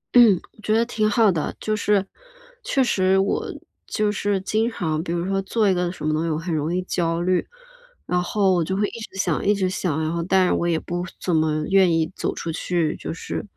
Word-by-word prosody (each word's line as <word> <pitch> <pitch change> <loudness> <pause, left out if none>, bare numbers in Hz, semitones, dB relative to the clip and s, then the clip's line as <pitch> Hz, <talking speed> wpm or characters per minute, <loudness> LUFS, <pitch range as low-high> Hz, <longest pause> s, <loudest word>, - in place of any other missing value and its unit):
嗯， 225 -7 +7 0.2
觉 215 +1 +1
得 230 +1 +3
挺 215 -3 0
好 215 -1 +4
的。 160 -4 -2
就 215 - -1
是 205 -2 +1 0.6
确 270 - +2
实 190 -5 +2
我 195 +1 0 0.4
就 210 -1 0
是 205 -1 0
经 220 +4 0
常 160 -8 -2
比 170 - -4
如 170 0 -1
说 195 0 0
做 210 +2 +1
一 195 - +4
个 175 -1 0
什 180 - -7
么 155 - +1
东 155 +1 0
西 165 - -1
我 155 - 0
很 165 +1 -3
容 155 +2 -1
易 185 - -1
焦 165 -2 -1
虑， 180 0 +1 0.6
然 180 0 0
后 195 +1 +2
我 175 -2 +2
就 190 +4 -2
会 205 +1 +1
一 230 - -8
直 - - -19
想 175 -5 0
一 205 +1 +3
直 190 -2 0
想， 180 -4 -1
然 155 +1 -1
后 170 - -1
但 185 +1 +3
我 170 - 0
也 165 -2 +1
不 175 +2 -4 0.2
怎 180 - 0
么， 160 0 +3
呃， 155 0 -1
愿 190 -2 +4
意 165 +1 +1
走 - - -2
出 165 - -4
去， 165 -1 -1
就 - - -6
是 165 - -5
185 Hz, 255 characters per minute, -23 LUFS, 165-205 Hz, 0.6 s, 嗯